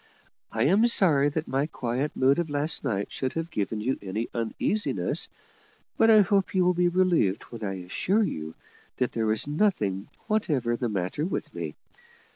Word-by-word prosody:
I - - 0
am 195 - +4
sorry 155 -11 +5
that 155 +2 -3
my 135 +3 0
quiet 130 +1 -3
mood 135 +4 +3
of 170 -2 -2
last 145 +1 0
night 100 -2 -2
should 130 -1 -3
have 165 +1 -4
given 105 -3 -2
you 130 +5 -1
any 105 +4 -4
uneasiness, 120 - -1 0.7
but 225 - +4
I 215 -1 +8
hope 195 0 +1
you 185 -1 +3
will 180 - +4
be 175 0 +2
relieved 175 - +2
when 115 -2 -8
I 95 -3 -4
assure 195 - +1
you 80 - -4 0.4
that 125 - 0
there 115 -1 -1
was 110 0 +2
nothing 130 - 0 0.2
whatever 150 - 0
the 120 0 -2
matter 95 +7 -2
with 180 - -3
me. 80 -3 -5
140 Hz, 175 wpm, -26 LUFS, 110-180 Hz, 0.7 s, I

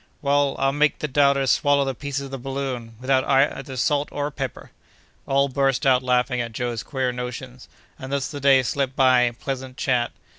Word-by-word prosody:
"Why, 140 -1 0 0.2
I'll 135 0 +2
make 145 +2 +2
the 150 - -3
doubters 140 -2 +3
swallow 145 -2 +3
the 135 - -2
pieces 140 +2 -4
of 135 - -10
the 135 - -5
balloon, 130 -3 -5
without 130 +1 +2
either 135 0 +1
salt 145 +3 +1
or 145 +1 -3
pepper!" 135 -3 -6 0.6
All 140 +1 +2
burst 135 0 0
out 130 -2 +4
laughing 125 0 +1
at 115 -1 -5
Joe's 120 -1 -3
queer 130 -3 -2
notions, 125 +1 -7 0.3
and 130 +1 -7
thus 140 -2 -1
the 145 - -6
day 135 -1 +5
slipped 135 +1 -2
by 130 -2 +5
in 120 -1 -2
pleasant 130 0 -6
chat. 125 -2 0
135 Hz, 190 wpm, -23 LUFS, 125-140 Hz, 0.6 s, day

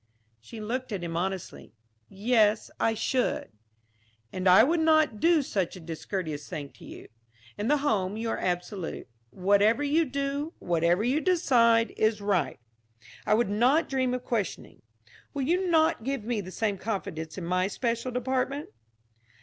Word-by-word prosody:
She 120 - -11
looked 245 +4 -4
at 195 -4 -3
him 165 -1 -4
honestly. 185 +1 -4 0.4
"Yes, 215 +1 +2
I 225 - +2
should." 250 - -1 0.8
"And 185 0 +1
I 190 +5 +8
would 325 +6 +2
not 310 -8 +3
do 330 0 +4
such 195 -9 -2
a - - -9
discourteous 160 -2 -5
thing 145 -5 -6
to - - -18
you. - - -11 0.5
In 205 +2 -3
the 295 +3 +4
home 200 -5 0
you 225 0 -2
are - - -2
absolute. 180 - -3 0.2
Whatever 205 - +3
you 310 +3 +2
do, 280 +3 -3
whatever 170 +3 +1
you 265 +6 +1
decide, 235 -11 +3
is 220 -1 +2
right. 200 -3 0 0.7
I 215 - +4
would 230 -2 +1
not 250 +10 +3
dream 260 -2 0
of 250 - -5
questioning. 225 -6 -3 0.5
Will 280 - -1
you 360 +7 +1
not 320 -5 +3
give 270 -2 -2
me 225 -1 -1
the 185 - -9
same 205 0 -2
confidence 160 -7 -4
in 180 - -5
my 185 +2 +1
special 235 +3 -2
department?" 260 +3 -2
225 Hz, 160 wpm, -27 LUFS, 185-265 Hz, 0.8 s, I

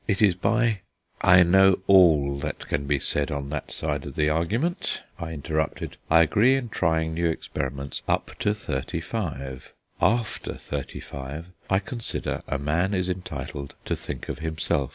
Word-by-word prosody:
It 100 - +1
is 100 -4 +6
by 115 +4 +1 0.2
" - - -21 0.2
"I 90 - +9
know 95 +2 +6
all 75 -8 +5
that - - -4
can 70 0 -1
be 70 0 +2
said 70 +2 0
on 70 -2 -3
that 75 - -4
side 75 -3 -2
of - - -8
the 75 0 +2
argument," 110 - 0 0.2
I 85 -1 -4
interrupted. 80 0 -2
"I 80 - +7
agree 115 +11 +4
in 130 -3 -2
trying 80 -5 +1
new 85 +1 +1
experiments 70 -3 -4
up - - 0
to 105 - +1
thirty 65 -10 -3
five; 65 0 -5 0.3
after 115 -1 +1
thirty 70 -2 -5
five 70 +6 -7 0.2
I 95 - +4
consider 115 +4 -3
a 70 - -1
man 80 +8 +1
is 90 0 0
entitled 80 -6 -5
to - - 0
think - - -6
of - - -4
himself. 80 -4 -1
80 Hz, 170 wpm, -26 LUFS, 70-95 Hz, 0.3 s, I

